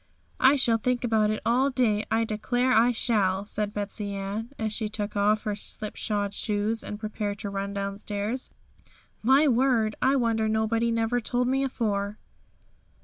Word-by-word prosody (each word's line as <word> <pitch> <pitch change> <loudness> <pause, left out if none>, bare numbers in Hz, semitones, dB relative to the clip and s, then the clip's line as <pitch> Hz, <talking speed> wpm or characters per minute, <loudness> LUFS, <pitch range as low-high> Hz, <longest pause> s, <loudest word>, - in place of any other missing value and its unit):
'I 265 +2 +6
shall 240 -4 +3
think 250 +2 0
about 220 -3 +2
it 215 - -2
all 255 +4 +3
day; 225 -5 +1
I 225 +1 +2
declare 245 +4 0
I 235 +2 +5
shall!' 205 -5 +1
said 210 0 -2
Betsey 205 0 -3
Ann, 200 +4 -4
as 220 -1 -2
she 215 -1 -2
took 210 -1 -4
off 210 +1 +2
her 210 - -1
slipshod 205 0 -3
shoes 210 +2 -1
and 210 - -6
prepared 210 -1 -3
to 200 -1 -5
run 200 0 -3
downstairs. 200 +4 -3 0.7
'My 270 +6 +5
word! 240 -4 +2
I 265 +2 +3
wonder 225 -4 +1
nobody 220 +1 +1
never 230 +1 +1
told 245 +1 -1
me 270 +2 +1
afore.' 210 -5 -2
220 Hz, 160 wpm, -27 LUFS, 205-240 Hz, 0.7 s, I